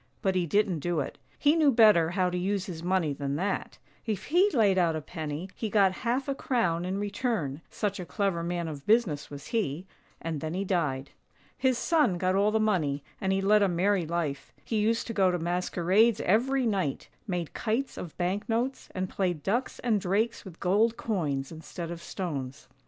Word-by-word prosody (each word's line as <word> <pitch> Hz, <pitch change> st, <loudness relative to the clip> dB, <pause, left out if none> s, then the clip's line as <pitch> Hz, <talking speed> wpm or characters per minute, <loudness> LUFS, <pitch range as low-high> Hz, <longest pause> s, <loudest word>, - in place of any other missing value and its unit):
But 190 Hz, -, +2 dB
he 180 Hz, -2 st, 0 dB
didn't 200 Hz, -2 st, +2 dB
do 175 Hz, +1 st, -1 dB
it 140 Hz, -, -4 dB
— -, -, -33 dB
he 295 Hz, +1 st, +4 dB
knew 310 Hz, -4 st, +5 dB
better 215 Hz, -9 st, +6 dB
how 180 Hz, 0 st, +1 dB
to -, -, -3 dB
use 195 Hz, +1 st, -1 dB
his 165 Hz, -4 st, -6 dB
money 175 Hz, -4 st, +1 dB
than 140 Hz, 0 st, -3 dB
that: 190 Hz, +5 st, -2 dB, 0.3 s
if 215 Hz, -4 st, -2 dB
he 360 Hz, +6 st, +4 dB
laid 205 Hz, -7 st, +3 dB
out 170 Hz, -2 st, +2 dB
a -, -, -1 dB
penny, 155 Hz, +1 st, -5 dB
he 220 Hz, -, -3 dB
got 200 Hz, -3 st, +4 dB
half 255 Hz, +3 st, 0 dB
a 275 Hz, -, 0 dB
crown 185 Hz, -, 0 dB
in 185 Hz, +2 st, -2 dB
return, 205 Hz, -, -2 dB
such 205 Hz, -2 st, -2 dB
a 180 Hz, -, -5 dB
clever 195 Hz, -5 st, 0 dB
man 170 Hz, 0 st, -2 dB
of 145 Hz, -3 st, -7 dB
business 210 Hz, -10 st, +2 dB
was 145 Hz, 0 st, -9 dB
he 185 Hz, -, -1 dB, 0.2 s
— -, -, -35 dB
and 160 Hz, -3 st, -4 dB
then 160 Hz, +1 st, -3 dB
he 195 Hz, +2 st, -1 dB
died. 145 Hz, -8 st, -1 dB, 0.4 s
His 260 Hz, -2 st, +1 dB
son 285 Hz, -, +2 dB
got 185 Hz, +1 st, +1 dB
all 200 Hz, +2 st, +3 dB
the 220 Hz, +1 st, +1 dB
money, 160 Hz, -10 st, +1 dB, 0.2 s
and 190 Hz, -, +1 dB
he 195 Hz, 0 st, +1 dB
led 210 Hz, +2 st, +4 dB
a 200 Hz, -, +4 dB
merry 180 Hz, 0 st, +1 dB
life; 160 Hz, -4 st, -3 dB
he 225 Hz, -, -1 dB
used 225 Hz, +2 st, +1 dB
to 230 Hz, -, -4 dB
go 195 Hz, -3 st, +4 dB
to 180 Hz, -, 0 dB
masquerades 180 Hz, +5 st, +2 dB
every 255 Hz, +7 st, +2 dB
night, 190 Hz, -, -1 dB, 0.2 s
made 175 Hz, -4 st, -3 dB
kites 235 Hz, +5 st, -1 dB
of 170 Hz, -, -8 dB
bank 185 Hz, +6 st, -1 dB
notes, 240 Hz, +4 st, -1 dB
and 185 Hz, 0 st, -1 dB
played 180 Hz, -5 st, -2 dB
ducks 240 Hz, +6 st, -1 dB
and 220 Hz, -4 st, +2 dB
drakes 210 Hz, +5 st, 0 dB
with 185 Hz, -4 st, -11 dB
gold 220 Hz, +6 st, +2 dB
coins 145 Hz, -11 st, -2 dB
instead 165 Hz, +1 st, -7 dB
of 170 Hz, -1 st, -6 dB
stones. 140 Hz, -9 st, -5 dB
190 Hz, 205 wpm, -28 LUFS, 170-215 Hz, 0.4 s, better